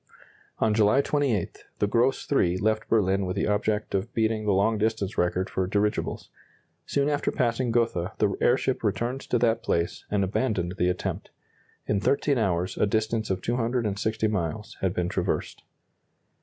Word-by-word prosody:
On 110 -1 +2
July 105 +4 +4
28, 140 - -1
the - - +2
"Gross 120 +6 +1
III" 90 -10 +3
left 110 +3 0
Berlin 100 -3 +2
with 90 - -2
the 100 - 0
object 105 +1 0
of 100 +4 -1
beating 110 -1 +1
the 105 - +2
long 100 +3 +2
distance 110 -2 -1
record 90 +2 0
for 95 -1 -2
dirigibles. 105 +2 -1 0.6
Soon 140 0 +1
after 145 -1 0
passing 120 -1 0
Gotha 115 -7 0
the - - +1
airship - - +2
returned 125 +3 -1
to 125 - 0
that 115 -1 +2
place, 85 -6 -1
and 100 -1 +1
abandoned 95 -3 -1
the 90 - +3
attempt. 90 - -3 0.6
In 105 - +1
13 140 +3 +1
hours 90 -3 0
a - - +3
distance 110 +1 0
of 95 -1 -2
260 115 -2 0
miles 105 +2 -3
had 95 -1 0
been 90 -1 0
traversed. 90 -1 -2
105 Hz, 160 wpm, -26 LUFS, 95-115 Hz, 0.6 s, July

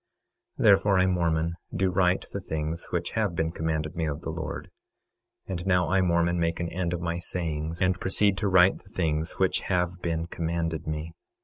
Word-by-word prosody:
26:12 - - -2
Therefore 100 -2 +5
I, 95 - +4
Mormon, 85 -3 +1 0.2
do 95 -1 +2
write 90 0 +2
the 100 - -2
things 80 -2 -3
which 85 -1 -2
have 105 -6 0
been 80 -1 0
commanded 80 -1 -2
me 80 -2 -1
of 75 +1 -3
the 80 - -4
Lord. 80 -2 -5 0.7
And 90 -2 -4
now 90 -2 +3
I, 95 0 +4
Mormon, 85 -1 +2
make 85 0 0
an 85 -1 -2
end 85 0 -2
of 85 - -3
my 85 0 -2
sayings, 80 -2 -3
and 90 0 +2
proceed 100 +1 +2
to 105 - 0
write 95 0 +5
the 95 - -20
things 80 -3 -1
which 95 -1 +1
have 90 -1 0
been 85 -1 -1
commanded 85 -2 -2
me. 80 +1 -4
85 Hz, 195 wpm, -27 LUFS, 80-90 Hz, 0.7 s, Therefore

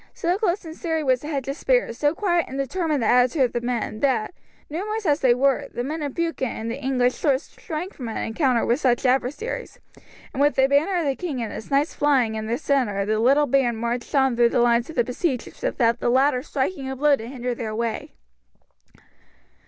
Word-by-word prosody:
So 345 +2 0
close 390 -3 0
and 320 0 -8
serried 320 -2 -2
was 255 -1 +3
the 295 - -7
hedge 275 -4 -3
of 275 - -2
spears, - - +1
so 295 +2 +2
quiet 345 -4 +1
and 265 - -6
determined 295 0 -1
the - - +1
attitude 250 +3 +4
of 245 - 0
the 240 - -1
men, 240 -3 -3
that, 265 +2 0 0.3
numerous 415 +7 -4
as 295 -2 +2
they 250 -2 +4
were, 270 +1 +1
the 240 - -3
men 310 +5 -4
of 285 -3 -4
Buchan 330 -6 -1
and 225 0 -4
the 280 - -6
English 250 -1 0
lords 280 -1 0
shrank 340 +5 -5
from 250 - -7
an 220 - -4
encounter 240 +1 +1
with 240 +4 +1
such 255 -2 +1
adversaries, 265 - -1 0.6
and 270 - -2
with 290 +1 +3
the 265 - +4
banner 290 +7 +2
of 340 - 0
the 275 -1 0
king 310 -7 -4
and 220 - -5
his 215 - -8
knights 280 +3 +1
flying 265 -6 +2
in 220 0 -4
their 235 +2 0
centre 250 -9 0
the 215 +1 0
little 275 +6 +4
band 250 -4 +1
marched 235 +4 -3
on 265 -3 +3
through 235 0 +4
the - - +1
lines 235 +2 +3
of 320 - -8
the 240 - +3
besiegers 250 +1 -3
without 235 -2 +1
the - - 0
latter 260 +1 +3
striking 275 0 -3
a 265 - -4
blow 290 +2 +4
to 225 -3 -8
hinder 250 -1 -3
their 225 -2 -5
way. 235 +6 -3
265 Hz, 225 wpm, -23 LUFS, 240-300 Hz, 0.6 s, attitude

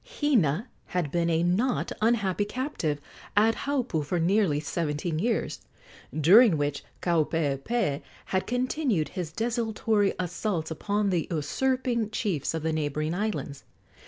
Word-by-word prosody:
Hina 225 - +2 0.3
had 160 -6 0
been 170 -1 +1
a 165 0 +2
not 210 +9 +1
unhappy 210 -4 +2
captive 205 - -2 0.4
at 220 +2 +5
Haupu 255 - -1
for 170 +5 -1
nearly 175 -3 +2
seventeen 155 +1 -2
years, 230 +5 -1 0.6
during 190 - +7
which 145 -1 -1 0.2
Kaupeepee 160 - 0 0.2
had 190 0 -1
continued 245 - 0
his 175 -5 -5
desultory 220 -2 0
assaults 180 -2 -2
upon 205 +5 0
the 170 -3 0
usurping 235 - 0
chiefs 195 - -1
of 160 - -3
the 160 0 0
neighboring 155 +1 -1
islands. 190 -8 -3
185 Hz, 125 wpm, -27 LUFS, 155-225 Hz, 0.6 s, during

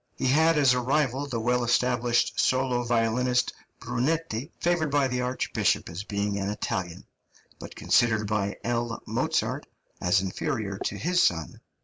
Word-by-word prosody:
He - - -3
had 160 +5 +4
as 135 -4 +5
a 125 - +1
rival 135 +1 0
the 120 -4 -3
well 125 +2 +1
established 120 0 +1
solo 130 -1 +1
violinist, 120 +1 +1 0.3
Brunetti, 145 0 -2
favoured 175 -3 +1
by 140 -1 +2
the 125 -1 -2
archbishop 125 +1 0
as 85 +4 -6
being 100 -1 -2
an 100 0 -2
Italian, 95 -4 -4 0.5
but - - -10
considered 110 -3 +2
by 100 -1 -1
L. 120 0 -2
Mozart - - -1 0.3
as 90 +2 +3
inferior 100 +1 -3
to 100 - -2
his 180 - +1
son. 80 -3 0
120 Hz, 145 wpm, -27 LUFS, 105-135 Hz, 0.5 s, as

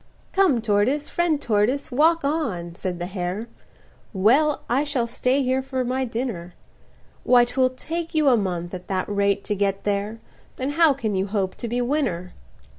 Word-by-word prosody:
"Come 360 -12 +3
tortoise, 235 +7 +1
friend 340 -4 +1
tortoise, 235 +4 0
walk 320 +4 +3
on," 225 - -2
said 180 0 -4
the 175 - -4
hare, 185 +4 -4 0.7
"Well, 265 +10 +3
I 260 +5 +2
shall 285 -5 0
stay 255 +3 0
here 260 +1 +1
for 260 -1 -3
my 260 +2 -1
dinner; 225 -8 -4 0.7
Why, 245 -1 +5
'twill 255 +1 +1
take 325 +6 -5
you 305 -2 +3
a 260 - +6
month, 180 -4 -2
at 180 -1 -7
that 185 -1 -1
rate, 200 -1 +1
to - - -2
get 195 -1 -1
there, 205 +2 -2 0.4
Then 260 +2 -2
how 320 -1 +4
can 220 -6 -2
you 190 +1 0
hope 195 -2 -1
to 235 - -5
be 240 +2 -1
winner?" 245 - -1
240 Hz, 175 wpm, -23 LUFS, 200-275 Hz, 0.7 s, a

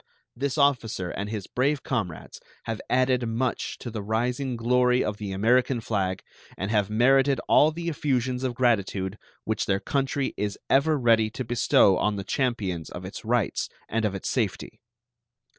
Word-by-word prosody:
This 140 +3 -2
officer 120 -10 +1
and 100 +1 -4
his 105 -3 -4
brave 140 +3 0
comrades 90 - -4 0.2
have 115 -1 -4
added 125 -1 +2
much 120 +3 -2
to 120 - -7
the 110 -1 -4
rising 120 +5 -1
glory 125 +2 +2
of 105 -1 -3
the 105 -2 -5
American 120 +6 +2
flag, 95 -4 -2 0.3
and 95 +2 -3
have 105 -2 +1
merited 135 +4 +3
all 150 - +6
the 170 +2 -6
effusions 130 -5 -1
of 125 -2 -1
gratitude 100 -5 0 0.2
which 110 - -2
their 95 0 +1
country 135 +3 -1
is 105 -1 -2
ever 150 +3 +4
ready 115 -4 +3
to 125 +3 -5
bestow 110 -4 +4
on 105 0 +1
the 100 - -4
champions 100 - -2
of 90 +1 -8
its 100 +5 -8
rights 120 -1 0 0.2
and 115 0 -1
of 105 -2 0
its 95 - -5
safety. 105 -6 -2
115 Hz, 165 wpm, -26 LUFS, 105-130 Hz, 0.3 s, all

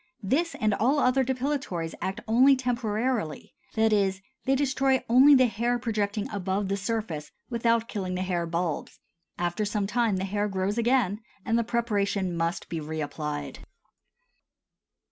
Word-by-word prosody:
This 320 - 0
and 215 -1 +2
all 255 +8 +2
other 265 -1 +3
depilatories 255 - -2
act 190 +1 -3
only 255 +5 +6
temporarily, 235 - -2 0.2
that 220 -1 +3
is, 195 -2 +2 0.3
they 270 0 +3
destroy 270 -1 +1
only 265 +5 +7
the 260 -1 +6
hair 240 +2 0
projecting 210 -3 -1
above 195 0 -2
the 200 - +1
surface 195 -7 -3 0.2
without 230 -1 +1
killing 185 -5 -3
the 185 - -1
hair 175 -2 -1
bulbs; 170 -2 -3 0.4
after 175 +4 -1
some 205 -1 -1
time 225 -1 +1
the 190 - -2
hair 205 +1 -1
grows 195 +2 -1
again 230 -4 +2 0.3
and 225 - +1
the 235 - +3
preparation 200 -5 0
must 170 +2 -2
be 165 - -4
reapplied. 150 -2 -4
210 Hz, 145 wpm, -27 LUFS, 185-240 Hz, 0.4 s, only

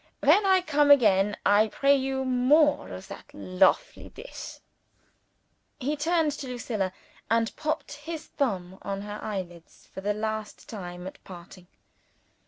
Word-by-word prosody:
When 410 -1 +5
I 380 -1 +5
come 295 -4 +2
again, 210 -7 +5
I 205 +2 +5
pray 275 +6 +3
you 265 0 -1
more 265 +4 +3
of - - -8
that - - -10
lofely 185 +1 +1
dish." - - -9 1.2
He 285 +3 -1
turned 320 +1 +1
to 275 - -6
Lucilla, 225 -6 -3 0.4
and 230 0 +1
popped 310 -1 -3
his 310 +2 -7
thumb 190 -9 -3
on 195 0 -4
her 210 +1 -6
eyelids 180 -6 -7
for 190 - -6
the 205 +1 -1
last 215 0 -4
time 180 -4 -7
at 190 - -9
parting. 180 0 -12
225 Hz, 140 wpm, -27 LUFS, 195-290 Hz, 1.2 s, When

